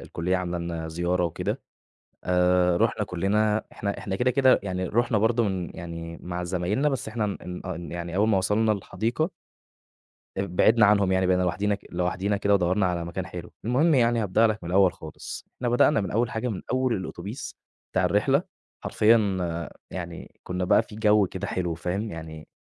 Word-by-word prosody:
الكلية 90 +3 -2
عاملة 90 -1 -2
لنا 85 -1 -4
زيارة 85 +2 0
وكده، 85 - -2 0.6
آآ 90 0 +3
رُحنا - - +1
كُلّنا 105 +4 +1
إحنا 100 -1 -3
إحنا 95 -1 -3
كده، 125 +5 +2
كده، 130 0 +4
يعني 95 -2 -2
رُحنا 120 +1 +1
برضه 115 +3 +2
من 95 -4 -2
يعني 85 -1 -7
مع 90 0 -4
زمايلنا 95 +10 0
بس 135 -5 -3
إحنا 110 0 -2
إن 90 -3 -5
أن 85 -3 -5
يعني 85 0 -4
أول 105 +2 +3
ما 105 -3 +3
وصلنا 110 +3 +2
الحديقة 115 - -2 1.1
ب 95 -2 -3
بعدنا 110 +1 +6
عنهم 100 -2 +3
يعني 95 0 +2
بقينا 90 0 +3
لوحدينا 95 +4 0
ك 100 - -11
لوحدينا 90 +3 -1
كده 100 0 +2
ودوّرنا 95 +1 +2
على 85 -1 -1
مكان 85 +2 -4
حلو، 90 -1 -8
المهم 140 +8 +3
يعني 120 -3 +3
هابدأ 105 +3 +3
لك 110 -4 -2
من 85 - -5
الأول 95 0 +5
خالص، 80 -1 -9
إحنا 125 - -2
بدأنا 120 +3 +4
من 95 - -3
أول 115 +2 +1
حاجة 115 +3 -2
من 105 -6 -4
أول 130 -2 +1
الأوتوبيس 95 +6 -6 0.4
بتاع - - +2
الرحلة، 135 +9 +3 0.4
حرفيًا 115 +2 +4 0.7
يعني 85 -2 -8
كنّا 90 0 -3
بقى 90 - +4
في 110 - -13
جو 105 -2 +4
كده 95 +2 -5
حلو 90 -3 -2
فاهم، 95 +6 -3
يعني 80 -2 -8
95 Hz, 180 wpm, -26 LUFS, 90-110 Hz, 1.1 s, بعدنا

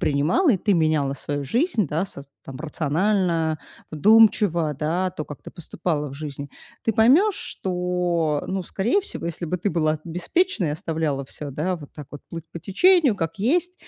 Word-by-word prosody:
принимала 155 - +2
и - - +2
ты 200 +2 +1
меняла 155 -4 +1
свою 145 +1 -4
жизнь, 235 - +1
да, 160 +6 0
саз 140 -6 -10 0.2
там, 135 - -8
рационально, 165 +1 0 0.3
вдумчиво, 190 -3 +4
да, 175 +5 0
то, 155 -4 -6
как 145 - -10
ты - - -9
поступала 155 -2 -3
в 135 - -9
жизни. 140 -1 -6 0.3
Ты 225 - +1
поймешь, 295 - +5
что, 180 -4 -1
ну, 190 -1 -2
скорее 230 - 0
всего, 170 - -6
если 170 +1 -4
бы 180 +2 -2
ты 205 - 0
была 155 -2 +1
беспечной, 180 - 0
и - - -1
оставляла 155 -3 -2
всё, 145 0 -7
да, 175 +7 -2
вот 145 -3 -12
так 150 -3 -9
вот 145 - -10
плыть 165 -1 -6
по 170 - -7
течению, 300 - +4
как 165 -2 -3
есть. 350 - +1
170 Hz, 175 wpm, -23 LUFS, 150-205 Hz, 0.3 s, поймешь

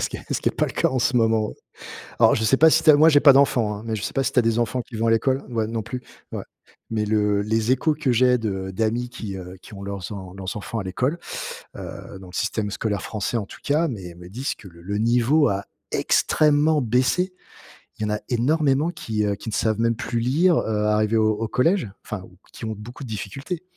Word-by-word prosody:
Et - - -3
ce - - 0
qui - - -6
est - - -7
ce - - -1
qui - - +2
est - - -6
pas - - +3
le - - -6
cas - - +2
en 130 - -1
ce 125 +1 +1
moment. 110 -2 +2 0.7
Alors, - - +6
je 110 - -1
sais 125 +5 +3
pas 160 +3 +7
si 160 +1 +3
tu 160 - +5
as 150 - +9
moi, 155 +2 +6
j'ai 145 - +6
pas 140 -1 +8
d'enfants 125 -6 +3
hein, 105 - -9
mais 110 -1 -2
je 105 - -5
sais - - -3
pas 135 - +1
si 135 - 0
tu 130 - +3
as - - +6
des 115 0 +1
enfants 120 +2 0
qui 120 -1 -11
vont 115 +1 0
à 115 - +4
l'école 130 +4 +1
ouais, 115 -3 -1
non 115 0 -3
plus, 125 +4 -6 0.3
ouais. - - -4 0.5
Mais 110 -1 0
le 105 -1 +2
les 110 +2 0
échos 150 +4 +2
que 145 -4 0
j'ai 125 +1 +4
de 95 -4 -3
d'amis 115 +4 -1
qui, 105 -5 -6
heu, 90 0 -8
qui - - -14
ont 100 -1 -8
leurs 100 -3 -5
en 95 -3 -7
leurs 95 -1 -5
enfants 110 +3 -4
à - - -3
l'école, 125 - -1 0.6
heu, 95 - -8
dans 95 - -11
le - - -13
système 105 -2 -1
scolaire 105 -1 -2
français 110 +2 -3
en 105 - -4
tout - - -13
cas, 155 +4 +1
mais 95 - -6
me 90 +1 -12
disent 125 +9 -3
que 100 - -13
le 85 0 -16
le 100 +3 -3
niveau 120 +7 +3
a 100 0 -2 0.3
extrêmement 150 0 +3
baissé. 130 - +1 0.7
Il - - -5
y - - +1
en - - +1
a 105 - -3
énormément 140 +4 +2
qui, 110 -10 -2
heu, 100 -1 0
qui 110 - -9
ne - - -4
savent 110 -1 +1
même 115 0 +2
plus 120 +1 -3
lire, 160 +9 +3
heu, 105 -1 0
arrivé 105 +1 +2
au 110 0 +3
au 110 +1 -3
collège. 165 - +2 0.2
Enfin, 110 -6 -5
ou 90 0 -16 0.2
qui - - -9
ont 110 -1 -3
beaucoup 120 +6 -9
de 125 - -8
difficultés. 135 - -5
115 Hz, 265 wpm, -23 LUFS, 105-130 Hz, 0.7 s, as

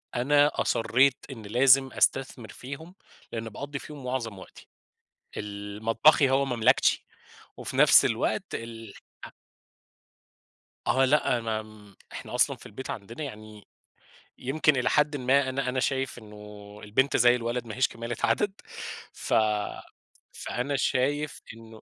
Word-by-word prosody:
أنا 145 +4 +3
أصرِّيت 130 +4 +2
إن 120 -4 -9
لازم 130 +5 +4
أستثمر 130 -4 0
فيهم، 140 - -9 0.4
لأن 115 -1 -5
باقضي 140 +6 -6
فيهم 145 -3 -10
معظم 115 -6 -3
وقتي، - - -14 0.7
ال 105 0 -7
مطبخي 130 +5 +4
هو 135 +1 +2
مملكتي 125 -1 +2 0.5
وفي - - -6
نفس - - +7
الوقت - - -1
الح 115 -3 -8 1.9
آه، 135 +1 +3
لأ، 130 -3 +2
ما 110 -2 -6 0.2
إحنا - - -8
أصلًا - - +2
في - - -15
البيت 130 +6 -8
عندنا 115 +7 -7
يعني، 110 -4 -10 0.7
يمكن 150 +3 +1
إلى 125 -2 +1
حدٍ 150 0 +2
ما 130 +1 +2
أنا 130 0 -2
أنا 130 +1 -1
شايف 135 0 -1
إنه 105 -1 -12
البنت 130 +7 +1
زي 120 +1 +5
الولد 120 0 -3
ما 110 - -7
هيش 130 0 +3
كمالة 115 +1 -6
عدد 210 -1 +2 0.6
ف - - -4 1.0
فأنا 140 +4 -3
شايف 140 +3 0
إنه 115 -1 -14
125 Hz, 130 wpm, -27 LUFS, 110-135 Hz, 1.9 s, نفس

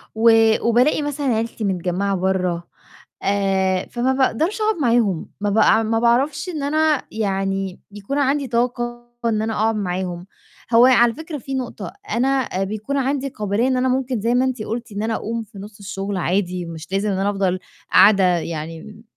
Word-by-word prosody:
و 230 +1 +5 0.4
وبالاقي 250 +6 +3
مثلًا 290 -1 -3
عيلتي 225 0 -3
متجمّعة 190 +1 -1
برّه 185 -2 0 0.6
آآ، 195 -2 +1
فما 250 +2 +1
باقدرش 310 - 0
أقعد 430 0 +2
معاهم، 230 -8 +2
ما 205 - 0
باع 220 +1 +4
ما 225 +1 0
باعرفش 270 +9 +1
إن 305 -5 -4
أنا 310 0 +2
يعني 195 -3 -2
يكون 205 +7 -5
عندي 280 0 +1
طاقة 240 0 -2 0.2
إن 220 -2 +1
أنا 225 0 -2
أقعد 220 +1 +1
معاهم، 180 -2 -3 0.5
هو 235 +2 +7
على 240 -2 +5
فكرة 320 0 -7
في 270 +2 -7
نقطة 255 -2 -5 0.2
أنا 260 -6 0
بيكون 215 +8 -3
عندي 275 0 0
قابلية 215 +1 -1
إن 260 - +1
أنا 255 +1 +1
ممكن 255 -3 -1
زي 230 +3 +1
ما 255 +1 +3
أنتِ 250 -4 -2
قُلتِ 235 +1 -5
إن 205 +1 -3
أنا 225 0 -1
أقوم 230 +2 -3
في 220 -1 -16
نُصّ 205 +1 -11
الشغل 195 0 -4
عادي، 180 -1 -1
مش 165 0 -9
لازم 200 +2 0
إن 190 - -1
أنا 195 +1 +1
أفضل 190 -2 0 0.3
قاعدة 200 -2 +7 0.2
يعني، 165 +7 -7
220 Hz, 170 wpm, -21 LUFS, 195-255 Hz, 0.6 s, هو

